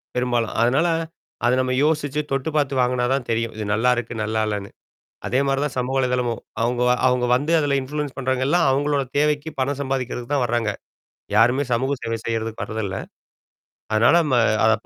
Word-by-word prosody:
பெரும்பாலும். 120 -2 0
அதனால, 135 +8 +3 0.6
அத 120 - +4
நம்ப 130 0 -1
யோசிச்சு, 150 -1 +1
தொட்டு 135 +2 -1
பாத்து 145 -2 +1
வாங்குனாதான் 125 +1 0
தெரியும். 115 0 -1
இது 110 - -3
நல்லாருக்கு, 120 +1 +1
நல்லா 110 +1 -1
இல்லன்னு. 100 -2 -3 0.6
அதே 125 - +1
மாரிதான் 135 0 -1
சமூக 125 +1 -1
வலைத்தளமும். 125 -3 0 0.2
அவுங்க 120 +1 0
வ 125 - +5
அவுங்க 125 -1 +2
வந்து 145 +5 -1
அதுல 145 -2 +1
இன்ஃப்ளூயன்ஸ் 145 +1 -4
பண்றவங்க 130 -1 0
எல்லாம் 170 +1 +3
அவங்களோட 140 +1 +1 0.2
தேவைக்கு, 150 +1 +1
பணம் 135 +1 -1
சம்பாதிக்கிறதுக்குத் 130 -1 -3
தான் 135 -3 +2
வர்றாங்க. 115 -2 0 0.7
யாருமே 125 +6 +4
சமூக 130 +4 +1
சேவை 115 0 -2
செய்யறதுக்கு 115 -1 -3
வர்றது 110 0 -4
இல்ல. 95 0 -4 1.0
அதனால 110 +5 +5
நம்ம 140 -5 +1 0.3
அதப் 110 - +2
125 Hz, 160 wpm, -22 LUFS, 115-140 Hz, 1.0 s, வ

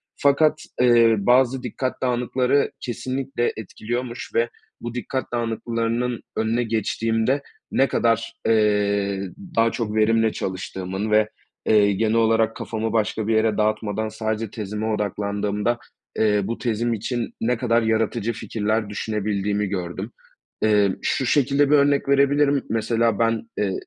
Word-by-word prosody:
Fakat, 150 +2 +3 0.2
eee, 120 -2 +5
bazı 125 +4 +3
dikkat 130 +2 -3
dağınıkları 125 +2 +1
kesinlikle 130 0 -2
etkiliyormuş 120 +3 -5
ve 115 +1 +2 0.3
bu 120 0 -5
dikkat 130 +2 -4
dağınıklarının 115 +1 -1 0.2
önüne 115 +2 +1
geçtiğimde 115 +3 0 0.3
ne 135 - +3
kadar, 115 -2 +1
eee, 100 -3 +1 0.3
daha 115 0 +3
çok 110 -3 -3
verimle 110 +1 +3
çalıştığımın 95 +2 -4
ve, 105 0 +4 0.4
eee, 100 -2 +4
genel 110 +3 +1
olarak 115 0 +3
kafamı 110 0 -3
başka 110 -1 0
bir 110 - +2
yere 110 -1 +2
dağıtmadan 110 0 0
sadece 110 0 -3
tezime 105 0 -4
odaklandığımda, 105 +1 -1 0.4
eee, 105 -2 +3
bu 115 +4 -3
tezim 120 0 -1
için 115 +2 -3
ne 125 +2 +1
kadar 115 -1 +2
yaratıcı 110 +1 0
fikirler 110 0 -2
düşünebildiğimi 105 -1 -1
gördüm. 95 +2 -4 0.5
Emm, 105 -3 +3
şu 135 - 0
şekilde 140 +2 +3
bir - - +7
örnek 140 -1 +2
verebilirim. 140 0 +3
Mesela, 115 0 +1
ben, 115 0 0
eee, 100 -2 0
115 Hz, 130 wpm, -23 LUFS, 105-120 Hz, 0.5 s, bir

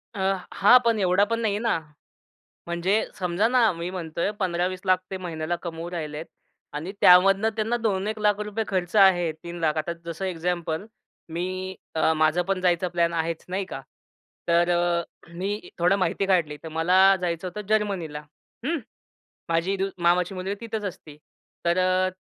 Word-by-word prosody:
अ, - - -5 0.3
हां 205 +5 +7
पण 230 -2 +3
एवढा 185 +1 +3
पण 230 - +1
नाही 210 -3 0
ना, 230 -4 +1 0.9
म्हणजे 175 +5 +1
समजा 180 +3 +1
ना, 240 -3 +4
मी 170 +1 -5
म्हणतोय 170 0 -2
15-20 185 +1 +1
ते 190 - -3
महिन्याला 170 -2 -3
कमवू 170 0 -5
राहिलेत. 155 -3 -5 0.5
आणि 155 +6 -5
त्यामधनं 195 +4 +6
त्यांना 220 +2 0
2-1 210 -1 0
रुपये 210 +2 -3
खर्च 180 -1 -2
आहे, 185 -4 +5
3, 170 -3 -1
आता 155 +2 -1
जसं 170 +3 -5
एक्झाम्पल, 175 0 -2 0.5
मी 185 +2 -3 0.2
अ, 160 0 +3
माझं 155 +3 +3
पण 195 -1 0
जायचा 180 0 +2
प्लॅन 170 -1 +1
आहेच, 165 0 -2
नाही 190 +2 -2
का? 190 - -7 0.7
तर 170 +1 +3
अ, 175 0 +2 0.3
मी 200 +4 -4
थोडं 180 +3 +3
माहिती 195 +1 0
काढली, 170 -6 +1
तर 160 - -7
मला 165 +3 +1 0.2
जायचं 175 0 -2
होतं 205 +3 -7
जर्मनीला. 195 -8 0 0.4
हम्म. 330 +4 0 0.7
माझी 165 +4 +1
डू 190 - 0 0.2
मामाची 180 +2 +2
मुलगी 190 +2 -3
तिथेच 220 -2 -4
असती. 155 -6 -8 0.5
तर 170 +1 +2
अ, 185 0 +2
180 Hz, 155 wpm, -25 LUFS, 170-195 Hz, 0.9 s, हां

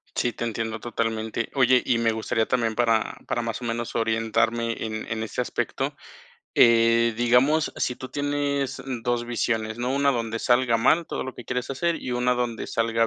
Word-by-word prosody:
Sí, 120 - +1
te 120 - -6
entiendo 110 -1 -3
totalmente. 115 -1 -2
Oye, 130 -1 +5
y 120 - +1
me 115 -1 +2
gustaría 110 0 0
también 115 -3 0
para 115 -2 +1
para 120 - -1
más 115 +1 -4
o - - -5
menos 115 0 -3
orientarme 115 +1 +1
en 110 0 -5
en 110 0 -2
ese 110 - -3
aspecto, - - -2 0.6
eh, 115 0 +5
digamos, 125 +7 +3
si 125 - -1
tú 130 - -8
tienes, 145 -1 -1
mm, 125 -4 -5
2 120 -1 0
visiones, 110 -1 -1
¿no? 125 +1 -1
Una 140 0 +3
donde 115 -1 -2
salga 120 0 +3
mal 160 +9 +3
todo 130 - -4
que 125 - -10
quieres 125 +1 -3
hacer 170 +5 0
y 125 - -4
una 125 0 +2
donde 120 -2 -3
salga 115 0 +1
120 Hz, 185 wpm, -25 LUFS, 115-125 Hz, 0.6 s, Oye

